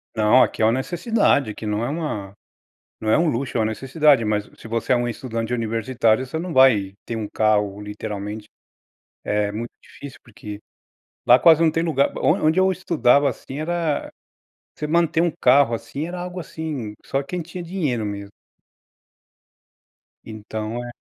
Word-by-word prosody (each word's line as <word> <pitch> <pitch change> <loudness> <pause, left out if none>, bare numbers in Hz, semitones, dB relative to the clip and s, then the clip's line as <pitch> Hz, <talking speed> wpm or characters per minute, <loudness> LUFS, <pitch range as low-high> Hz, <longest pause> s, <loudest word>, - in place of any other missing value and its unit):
Não, 110 +3 +5
aqui - - +1
é - - +5
uma 110 - +4
necessidade, 155 - +1
aqui 105 - -8
não 105 +1 -1
é 120 - -1
uma 140 - -4 0.7
não 110 0 -1
é - - +4
um 165 0 +2
luxo, 130 -2 -2
é - - +2
uma 110 - +2
necessidade, 135 +3 +2
mas 105 -1 -1
se - - -12
você 115 +2 -1
é - - +5
um 120 0 -1
estudante 115 0 -4
universitário 115 +1 +1
você 145 +5 -4
não 175 +1 -4
vai 110 -8 +4
ter 115 - -4
um 110 -2 -4
carro 105 -2 +1
literalmente. 105 +1 -6 0.8
É 105 0 0
muito 115 +3 -5
difícil 140 -2 -12
porque 105 -2 -9 0.7
lá 125 +1 +8
quase 165 -1 +6
não 160 - +4
tem 165 +1 0
lugar 145 -5 +1
o - - -5 0.2
onde 160 +4 +3
eu 190 0 +4
estudava 155 -7 +2
assim, 135 +2 -8
era 165 -1 -1 0.7
você 150 - -3
manter 165 0 +2
um 170 -1 +2
carro, 130 -1 +5
assim, 140 +6 -4
era 180 +1 -6
algo, 180 +1 -6
assim, 150 -10 -5
só 135 +1 -1
quem 175 +6 -4
tinha 175 +2 -7
dinheiro 155 - -2
mesmo. 100 -1 -5 2.0
Então 110 +2 -5
é 120 - -7
125 Hz, 170 wpm, -22 LUFS, 110-155 Hz, 2.0 s, lá